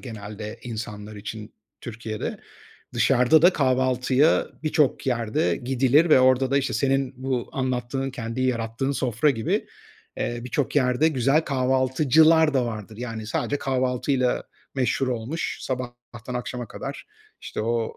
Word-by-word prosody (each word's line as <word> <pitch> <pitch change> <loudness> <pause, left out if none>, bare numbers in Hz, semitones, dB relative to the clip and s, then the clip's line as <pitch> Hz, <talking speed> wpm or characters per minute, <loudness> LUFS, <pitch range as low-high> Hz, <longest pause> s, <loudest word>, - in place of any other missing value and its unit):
genelde 105 -3 -8
insanlar 105 -2 -6
için 105 +1 -7 0.3
Türkiye'de. 110 -2 -5 0.5
Dışarıda 135 +4 +4
da 180 +2 +7
kahvaltıya 130 +1 +2 0.2
birçok 155 -4 +1
yerde 115 -8 0
gidilir 135 +5 +2
ve 130 - +7
orada 130 0 +4
da, 140 - +3
işte, 135 - -1
senin 135 -1 +1
bu 130 -3 -1
anlattığın, 130 +1 -2
kendi 120 -1 -5
yarattığın 125 +1 -1
sofra 130 +2 +1
gibi, 115 -5 -1 0.5
eee, 120 0 -2
birçok 130 +3 -2
yerde 130 +3 +3
güzel 135 +1 +2
kahvaltıcılar 140 +3 +3
da 130 -2 +2
vardır. 110 -1 -6
Yani 115 -2 -5
sadece 130 +5 -1
kahvaltıyla 130 -1 0 0.3
meşhur 130 0 0
olmuş, 125 +6 -3
sabahtan 120 -1 -6
akşama 125 -1 -4
kadar, - - -7 0.3
işte, - - -5
o, 115 +1 -1
125 Hz, 125 wpm, -24 LUFS, 115-135 Hz, 0.5 s, da